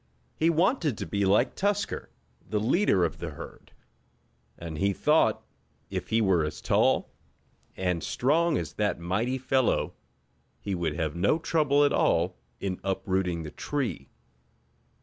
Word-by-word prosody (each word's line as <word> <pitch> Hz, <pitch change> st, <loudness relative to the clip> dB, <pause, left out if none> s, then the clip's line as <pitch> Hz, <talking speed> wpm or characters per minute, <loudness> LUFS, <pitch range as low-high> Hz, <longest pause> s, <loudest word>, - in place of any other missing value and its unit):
He 160 Hz, -, +2 dB
wanted 170 Hz, -, +2 dB
to -, -, -4 dB
be 100 Hz, -1 st, 0 dB
like 105 Hz, +6 st, +3 dB
Tusker, 205 Hz, +1 st, -1 dB, 0.4 s
the 105 Hz, +1 st, 0 dB
leader 110 Hz, -, +3 dB
of 80 Hz, -, -4 dB
the -, -, -4 dB
herd, -, -, -11 dB, 0.9 s
and 80 Hz, -2 st, -6 dB
he 100 Hz, 0 st, +2 dB
thought 150 Hz, +10 st, +2 dB, 0.5 s
if -, -, -3 dB
he 115 Hz, +1 st, +2 dB
were 95 Hz, -6 st, +3 dB
as 75 Hz, -, -4 dB
tall, -, -, +2 dB, 0.7 s
and 90 Hz, -3 st, -1 dB
strong 155 Hz, +5 st, +1 dB
as -, -, -4 dB
that 105 Hz, -4 st, -1 dB
mighty 105 Hz, +10 st, -1 dB
fellow 130 Hz, -1 st, +1 dB, 0.7 s
he 100 Hz, -, -4 dB
would 85 Hz, -4 st, -1 dB
have 80 Hz, -3 st, -2 dB
no 95 Hz, -, +2 dB
trouble 150 Hz, -3 st, +2 dB
at 145 Hz, -, +2 dB
all -, -, +2 dB, 0.2 s
in 95 Hz, -2 st, -3 dB
uprooting 95 Hz, -3 st, -1 dB
the 75 Hz, -, -7 dB
tree. 130 Hz, -, -3 dB
105 Hz, 145 wpm, -27 LUFS, 90-145 Hz, 0.9 s, like